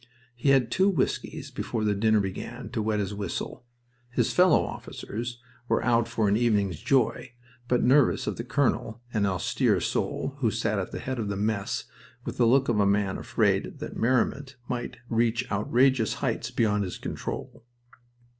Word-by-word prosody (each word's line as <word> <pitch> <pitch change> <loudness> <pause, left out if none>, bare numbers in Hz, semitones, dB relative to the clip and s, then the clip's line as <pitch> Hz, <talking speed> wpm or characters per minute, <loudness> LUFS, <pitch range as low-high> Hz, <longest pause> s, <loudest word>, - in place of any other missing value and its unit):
He 120 +4 0
had 130 -4 +4
two 190 +2 +3
whiskies 170 -10 -2
before 110 - -3
the 105 -1 +2
dinner 110 +1 +3
began 95 -2 -5
to - - -2
wet 105 0 0
his 100 0 -2
whistle. 100 +5 -5 0.4
His 120 - 0
fellow 180 -2 +5
officers 120 +2 -6 0.3
were - - +1
out 120 -2 +3
for 110 -2 0
an 100 - +3
evening's 105 -7 +1
joy, 125 -2 +1 0.3
but 125 -1 +2
nervous 135 +1 +4
of - - -2
the 115 - -3
colonel, 125 -3 0
an 105 -3 +2
austere 95 -4 +1
soul - - -2
who - - +2
sat - - -1
at - - -4
the - - -5
head 130 -1 -4
of 105 -3 -2
the 100 - -2
mess 105 0 -1 0.4
with - - -5
the 120 - +4
look 135 +3 +4
of 115 -3 +1
a 100 - +4
man 100 -1 +1
afraid - - 0
that - - -7
merriment 130 +3 0
might 120 -1 -4
reach 115 +1 +1
outrageous 120 +4 +2
heights - - -2
beyond 105 -3 +1
his 90 - -5
control. - - -6
115 Hz, 175 wpm, -27 LUFS, 105-125 Hz, 0.4 s, fellow